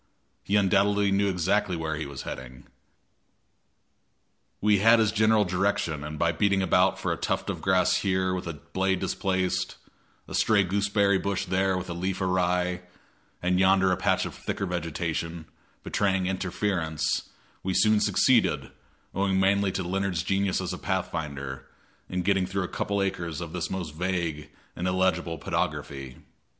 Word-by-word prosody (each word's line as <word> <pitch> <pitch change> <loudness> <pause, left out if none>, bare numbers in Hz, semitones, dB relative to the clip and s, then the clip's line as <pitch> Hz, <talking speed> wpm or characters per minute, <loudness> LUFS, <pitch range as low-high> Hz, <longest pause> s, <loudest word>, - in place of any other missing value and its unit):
He 100 - 0
undoubtedly 100 0 +3
knew 100 +1 +2
exactly 90 0 +1
where 80 -1 -2
he 75 -1 -4
was 70 -2 -7
heading. 65 0 -8 1.9
We 105 -1 +3
had 115 +3 +6
his 110 -2 +3
general 110 -1 +3
direction, 90 -5 0
and 75 +1 -6
by 85 +2 +2
beating 95 +3 +1
about 95 - +3
for - - -2
a - - -5
tuft - - -1
of - - -7
grass - - +3
here 95 -1 0
with 90 -2 -4
a 85 - -3
blade 95 +5 -1
displaced, 95 0 -1 0.5
a - - -9
stray 105 -3 +3
gooseberry 100 +1 +2
bush 100 0 -2
there 95 0 +1
with 90 - -5
a 85 - -4
leaf 95 +2 -2
awry, 90 -1 0 0.6
and 90 0 +2
yonder 95 0 +4
a - - +3
patch - - +1
of - - -6
thicker 95 - -4
vegetation, 85 -1 -3 0.4
betraying 95 -2 0
interference, 95 -3 -1 0.3
we 95 -1 -2
soon 110 -1 +4
succeeded, 100 - +2 0.4
owing 95 0 +1
mainly 100 0 +3
to 95 0 -2
Leonard's 95 -1 -1
genius 95 -1 +1
as - - -3
a - - -6
pathfinder, 70 -4 -3 0.4
in 90 0 -2
getting 95 -1 +2
through 95 0 -2
a - - -3
couple 100 +2 -2
of - - +2
acres 85 -4 -3
of 85 -2 -6
this 85 -2 -3
most 90 -5 -4
vague 85 -3 -2 0.3
and 90 - -2
illegible 90 -2 +1
pedography. 70 -2 -3
95 Hz, 160 wpm, -27 LUFS, 85-100 Hz, 1.9 s, had